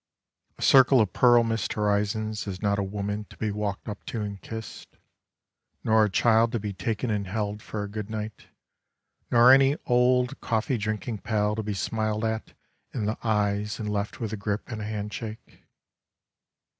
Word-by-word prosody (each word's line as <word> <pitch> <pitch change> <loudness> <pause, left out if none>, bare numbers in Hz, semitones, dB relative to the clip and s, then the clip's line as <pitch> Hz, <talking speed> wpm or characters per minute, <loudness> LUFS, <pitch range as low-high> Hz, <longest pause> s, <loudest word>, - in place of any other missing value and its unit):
A - - -6
circle 130 -1 +7
of 105 -4 +2
pearl 120 -1 +5
mist 115 -3 -1
horizons 105 +1 -1
is 95 -2 -4
not 100 -1 +1
a - - +1
woman 105 +1 -3
to - - -17
be 110 -1 -1
walked 105 -1 -3
up 105 - -6
to 115 - -4
and 100 -1 -6
kissed, 110 -1 -9 0.9
nor 110 -1 +4
a 105 - +2
child 115 +3 +3
to 115 - 0
be 105 -1 -4
taken 110 +4 -2
and 100 -2 -1
held 105 +1 -3
for 105 -2 -5
a - - -4
good 105 0 -6
night, 110 -1 -6 0.8
nor 120 +1 +7
any 135 +2 +5
old 125 0 +2
coffee 115 +2 0
drinking 110 +1 -3
pal 105 -1 0
to 110 - -2
be 105 -1 -3
smiled 110 +2 -1
at 110 0 -3 0.4
in 110 -5 -1
the 110 +2 -2
eyes 105 -1 0
and 105 -2 -4
left 100 0 -3
with 110 -2 -3
a - - -3
grip 105 +3 -3
and 110 -2 -4
a - - -4
handshake. 110 +1 -6
110 Hz, 180 wpm, -26 LUFS, 105-115 Hz, 0.9 s, circle